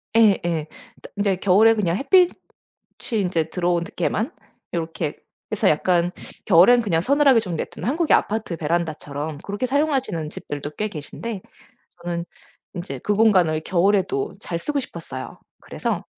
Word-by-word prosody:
예예. 175 Hz, -8 st, +3 dB, 0.5 s
인제 200 Hz, -1 st, +2 dB
겨울에 205 Hz, +4 st, +5 dB
그냥 185 Hz, -5 st, 0 dB
햇빛이 355 Hz, -, +4 dB, 0.9 s
인제 175 Hz, -3 st, 0 dB
들어오게만 180 Hz, -, -1 dB, 0.4 s
요렇게 165 Hz, -2 st, -3 dB, 0.4 s
해서 -, -, +2 dB
약간 175 Hz, +3 st, +2 dB, 0.4 s
겨울에는 215 Hz, +7 st, +6 dB
그냥 165 Hz, -6 st, +1 dB
서늘하게 275 Hz, -, +4 dB
좀 185 Hz, -5 st, -5 dB
내버려 -, -, -4 dB
두는 -, -, -5 dB
한국의 320 Hz, +3 st, +3 dB
아파트 210 Hz, -5 st, -2 dB
베란다처럼 155 Hz, -2 st, -3 dB
그렇게 205 Hz, +5 st, -3 dB
사용하시는 260 Hz, -, 0 dB
집들도 145 Hz, -1 st, -6 dB
꽤 215 Hz, +6 st, -2 dB
계신데 195 Hz, +6 st, -6 dB, 0.6 s
저는 170 Hz, -1 st, -3 dB, 0.5 s
인제 170 Hz, -7 st, -5 dB
그 205 Hz, -, +1 dB
공간을 185 Hz, -8 st, +4 dB
겨울에도 200 Hz, -, +1 dB
잘 170 Hz, -, -4 dB
쓰고 290 Hz, +9 st, -2 dB
싶었어요. 165 Hz, -, -8 dB, 0.2 s
그래서 -, -, -3 dB
185 Hz, 335 characters per minute, -22 LUFS, 165-225 Hz, 0.9 s, 겨울에는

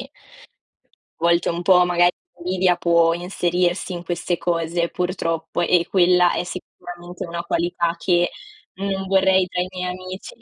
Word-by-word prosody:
a -, -, -9 dB, 1.1 s
volte 170 Hz, +1 st, +2 dB
un 170 Hz, 0 st, -2 dB
po' 180 Hz, 0 st, +5 dB
magari 175 Hz, 0 st, +3 dB, 0.2 s
l'invidia 180 Hz, 0 st, +1 dB
può 170 Hz, -1 st, +3 dB
inserirsi 175 Hz, +1 st, -1 dB
in 175 Hz, 0 st, -6 dB
queste 175 Hz, 0 st, -2 dB
cose 170 Hz, 0 st, -1 dB
purtroppo 170 Hz, -2 st, -3 dB
e 175 Hz, 0 st, +2 dB
quella 180 Hz, -1 st, +4 dB
è -, -, -1 dB
sicuramente 175 Hz, 0 st, -8 dB
una 170 Hz, 0 st, -4 dB
qualità 170 Hz, 0 st, -1 dB
che 175 Hz, 0 st, +2 dB, 0.5 s
non 195 Hz, 0 st, -3 dB
vorrei 190 Hz, -1 st, +3 dB
tra 180 Hz, 0 st, -2 dB
i 180 Hz, -, -2 dB
miei 180 Hz, -1 st, -4 dB
amici. 185 Hz, -, -8 dB
175 Hz, 145 wpm, -21 LUFS, 170-185 Hz, 1.1 s, po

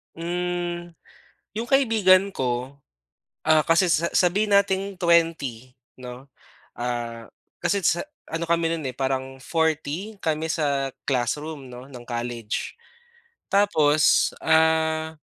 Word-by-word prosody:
Hmm, 175 Hz, 0 st, -3 dB, 0.6 s
yung 230 Hz, -, -2 dB
kaibigan 215 Hz, -8 st, +4 dB
ko. 130 Hz, -3 st, -3 dB, 0.7 s
Ah, 155 Hz, -2 st, +3 dB
kasi 170 Hz, +2 st, +3 dB
sa 165 Hz, +1 st, +2 dB
sabihin 200 Hz, +3 st, +2 dB
nating 200 Hz, 0 st, +2 dB
20 165 Hz, -9 st, +1 dB, 0.2 s
'no, 125 Hz, +2 st, -10 dB, 0.5 s
ah, 120 Hz, -1 st, -4 dB, 0.3 s
kasi 200 Hz, -2 st, 0 dB
sa 175 Hz, -, +1 dB, 0.2 s
ano 165 Hz, +1 st, -3 dB
kami 165 Hz, -1 st, +1 dB
no'n, 160 Hz, -4 st, -3 dB
eh, 130 Hz, -, -4 dB
parang 135 Hz, 0 st, -3 dB
40 160 Hz, +6 st, -1 dB
kami 160 Hz, 0 st, -1 dB
sa 140 Hz, -4 st, -1 dB
classroom 140 Hz, +3 st, -2 dB
'no, 125 Hz, +2 st, -11 dB
ng 120 Hz, -2 st, -11 dB
college. 120 Hz, -, -4 dB, 0.7 s
Tapos, 155 Hz, -7 st, +4 dB
ah, 160 Hz, 0 st, +2 dB
160 Hz, 110 wpm, -24 LUFS, 130-175 Hz, 0.7 s, kaibigan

